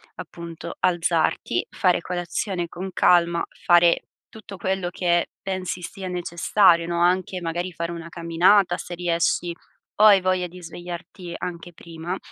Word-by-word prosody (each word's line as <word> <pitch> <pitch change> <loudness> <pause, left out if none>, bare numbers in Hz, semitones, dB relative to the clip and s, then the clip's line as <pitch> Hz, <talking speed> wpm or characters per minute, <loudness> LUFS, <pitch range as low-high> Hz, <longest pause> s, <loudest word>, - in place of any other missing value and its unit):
appunto 170 0 -8
alzarti, 175 - +1
fare 180 -2 +2
colazione 175 +1 -3
con 190 +3 -6
calma, 170 -1 +3 0.2
fare 175 -1 +5 0.3
tutto 215 -2 -11
quello 190 -1 -1
che 175 -1 +1
pensi 185 -2 -4
sia 190 +2 -7
necessario, 175 0 +2
no? 170 0 -1
Anche 180 +1 +1
magari 175 +2 -3
fare 170 +1 -4
una 170 -1 -7
camminata, 175 +3 +3
se 175 +1 -7
riesci 170 0 0 0.5
o 210 - +4
hai 200 -3 +8
voglia 185 -1 0
di 180 +1 -13
svegliarti 175 +1 -8
anche 175 -1 -6
prima. 165 +3 -6
175 Hz, 135 wpm, -23 LUFS, 170-185 Hz, 0.5 s, hai